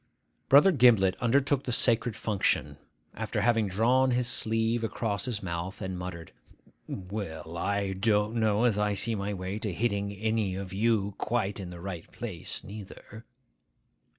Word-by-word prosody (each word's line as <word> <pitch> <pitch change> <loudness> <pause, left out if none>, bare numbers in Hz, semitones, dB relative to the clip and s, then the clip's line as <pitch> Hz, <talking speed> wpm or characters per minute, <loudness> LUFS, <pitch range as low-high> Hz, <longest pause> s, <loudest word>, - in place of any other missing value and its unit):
Brother 145 +8 +7
Gimblet 115 - +5
undertook 135 +3 +2
the 125 - -2
sacred 115 -1 +2
function, 105 -3 0 0.4
after - - -3
having 115 -3 +2
drawn 120 +7 +3
his 125 -1 +1
sleeve 115 +1 0
across 110 -1 -2
his 115 -5 -3
mouth, 85 +2 -4
and 95 0 -4
muttered, 90 -2 -7 0.6
'Well! 90 -4 -6
I 100 +2 -1
don't 105 +2 +1
know 110 0 +2
as 115 -4 +2
I 105 -1 +1
see 115 +4 +1
my 100 -1 -2
way 95 +1 -4
to 105 -2 -3
hitting 100 0 -1
any 105 -1 -1
of 95 -1 -6
you 105 -1 +1
quite 110 -3 -1
in 95 -2 -6
the 90 -1 -9
right 85 -2 -7
place 105 -9 -5
neither. 105 +2 -10
105 Hz, 150 wpm, -29 LUFS, 95-115 Hz, 0.6 s, Brother